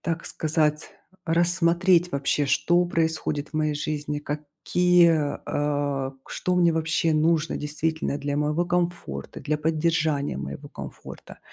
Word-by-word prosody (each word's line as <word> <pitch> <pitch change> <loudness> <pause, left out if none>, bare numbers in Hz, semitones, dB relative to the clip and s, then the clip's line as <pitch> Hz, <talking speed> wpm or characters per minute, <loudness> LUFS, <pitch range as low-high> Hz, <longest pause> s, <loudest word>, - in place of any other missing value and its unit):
так 165 -1 -3
сказать, 155 -1 0 0.3
рассмотреть 175 +1 +3
вообще, 140 0 0
что 175 +6 +3
происходит 160 -3 -1
в - - -24
моей 155 -1 +1
жизни. 150 0 -3
Какие, 155 +2 +2
э, 145 -2 -1
к - - -18
что 180 0 -1
мне 170 -2 +4
вообще 160 0 +1
нужно, 155 0 +2
действительно, 155 0 -2
для 145 0 -2
моего 150 +3 +1
комфорта, 175 - -3
для 150 - -1
поддержания 155 - 0
моего 70 +1 -7
комфорта. - - -10
155 Hz, 125 wpm, -25 LUFS, 145-170 Hz, 0.3 s, мне